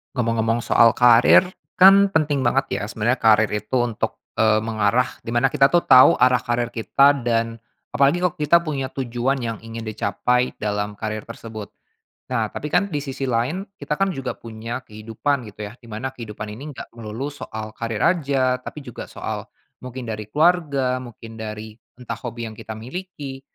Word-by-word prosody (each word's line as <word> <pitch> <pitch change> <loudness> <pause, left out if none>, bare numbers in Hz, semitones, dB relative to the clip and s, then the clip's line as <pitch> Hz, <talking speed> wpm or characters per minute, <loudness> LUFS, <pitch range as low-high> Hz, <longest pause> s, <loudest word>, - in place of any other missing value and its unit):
Ngomong-ngomong 115 -1 0
soal 115 -1 +5
karir, 120 -1 +6 0.3
kan 195 +2 +7
penting 145 -4 +1
banget 135 +3 +2
ya - - -4
sebenarnya 115 +4 0
karir 110 -2 +4
itu 105 +4 -1
untuk, 120 -3 -3 0.2
eee, 110 -1 +3
mengarah 110 +2 +1 0.2
di 115 - -4
mana 120 +3 +3
kita 135 +3 +3
tuh 175 - +5
tahu 130 0 +9
arah 125 0 +5
karir 120 -1 -1
kita 140 +5 +3
dan, 115 -1 0 0.3
apalagi 140 +6 +2
kalau 180 -1 0
kita 155 +3 +4
punya 140 -5 -4
tujuan 130 +1 -1
yang 115 -2 -3
ingin 115 0 -7
dicapai 125 +3 0
dalam 105 0 -2
karir 110 +1 -5
tersebut, 110 -2 -9 0.6
nah 115 -3 0
tapi 145 +7 -6
kan 200 +3 +1
di 145 - -1
sisi 135 -1 -4
lain 130 +10 -1
kita 150 -5 -4
kan 195 -1 +1
juga 135 -4 -5
punya 115 +2 -7
kehidupan 110 +4 -3
gitu 105 +1 -8
ya 105 - -9
di 115 - -15
mana 125 +5 -5
kehidupan 110 -3 -7
ini 135 +8 -8
enggak - - -6
melulu 115 +5 -6
soal 110 -6 -7
karir 115 -2 -4
aja 135 -7 +1
tapi 145 +2 -9
juga 125 - -8
soal, - - -6 0.3
mungkin 125 0 -7
dari 110 -2 -6
keluarga 145 -5 +2
mungkin 115 -2 -10
dari 110 0 -7 0.2
entah 115 -2 -6
hobi 120 -1 -5
yang 110 - -7
kita 110 0 -8
miliki, 140 +1 -7
120 Hz, 175 wpm, -22 LUFS, 110-135 Hz, 0.6 s, tahu